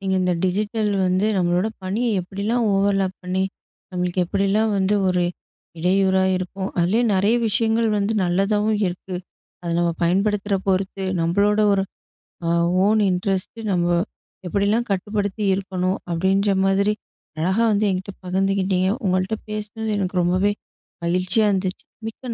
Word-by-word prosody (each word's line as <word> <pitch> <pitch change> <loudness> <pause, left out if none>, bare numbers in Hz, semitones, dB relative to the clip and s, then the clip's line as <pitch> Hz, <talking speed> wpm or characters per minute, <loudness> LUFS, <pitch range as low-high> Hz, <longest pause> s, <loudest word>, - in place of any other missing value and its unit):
நீங்க 190 -1 -1
"இந்த 180 - +2
டிஜிட்டல் 210 +3 0 0.2
வந்து, 185 +3 +2
நம்மளோட 175 +2 +1 0.2
பணிய 195 +6 -1 0.2
எப்படிலாம், 205 +6 -1
ஓவர்லாப் 195 -1 +1
பண்ணி, 185 +1 -1 0.5
நம்மளுக்கு 180 0 0
எப்படிலாம் 200 +4 +1
வந்து, 195 +1 +2
ஒரு 180 -1 +2 0.6
இடையூறா 190 +2 +2
இருக்கும். 190 +1 -4
அதுலயும் 220 +7 +2
நெறைய 200 +5 +3
விஷயங்கள் 225 +2 +2
வந்து 205 +2 0
நல்லதாவும் 205 +4 +1
இருக்கு. 180 +1 -5 0.5
அதை, 170 -1 -2
நம்ம 175 0 +2
பயன்படுத்துற 200 +3 +1
பொறுத்து, 190 0 0 0.2
நம்மளோட 200 +5 +2
ஒரு, 195 -1 +2 0.6
அ - - +2 0.4
ஓன் 215 +1 +3
இன்ட்ரெஸ்ட்டு 195 +4 -2
நம்ம 175 -2 +1 0.6
எப்படிலாம் 205 +5 +1
கட்டுப்படுத்தி 205 +2 -2
இருக்கணும்" 185 -1 -2
அப்படின்ற 190 +4 +2
மாதிரி, 200 +2 +2 0.5
அழகா 190 +8 +1
வந்து 210 0 +2
என்கிட்ட 190 +1 -4
பகிர்ந்துக்கிட்டீங்க. 190 0 +1 0.2
உங்கள்ட்ட 185 +3 0
பேசுனது 215 +1 -4
எனக்கு 185 -2 0
ரொம்பவே 185 +4 +2 0.5
மகிழ்ச்சியா 185 +5 +2
இருந்துச்சி. 190 -1 -2 0.2
மிக்க 235 +2 -6
195 Hz, 125 wpm, -22 LUFS, 185-210 Hz, 0.6 s, நெறைய